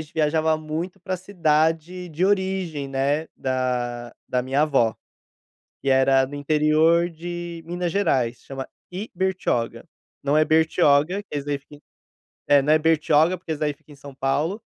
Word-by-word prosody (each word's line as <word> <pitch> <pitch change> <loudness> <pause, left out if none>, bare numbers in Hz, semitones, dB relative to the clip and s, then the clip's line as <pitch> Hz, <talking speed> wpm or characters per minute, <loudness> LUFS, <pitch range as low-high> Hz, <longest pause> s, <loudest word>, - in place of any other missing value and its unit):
gente 150 - -17
viajava 160 0 +2
muito 160 +5 -5
pra 185 0 -3
cidade 170 -1 0
de 165 +3 -1
origem, 190 -7 -1
né, 140 +4 0
da 125 -2 -2 0.2
da 125 -1 0
minha 135 +3 +1
avó, 135 -8 +2 0.8
que 140 - -3
era 135 0 +4
no 145 - -9
interior 155 +3 +3
de 175 0 -7
Minas 175 0 -3
Gerais, 125 -12 +1
chama 135 -1 -7 0.2
Ibertioga. 185 - -2 0.3
Não 145 +1 +1
é 155 - +5
Bertioga, 160 +2 +3
que 205 - -42
esse 140 - -7
daí 145 -1 -1
fica 140 +1 -16
em - - -21 0.7
É, 145 -1 +6
não 150 +3 +2
é 155 - +6
Bertioga, 160 +2 +3
porque 170 -2 -6
esse 155 - -5
daí 150 -1 0
fica 145 - -19
em - - -14
São 140 0 -12
Paulo, 150 +10 -1
155 Hz, 165 wpm, -23 LUFS, 140-175 Hz, 0.8 s, É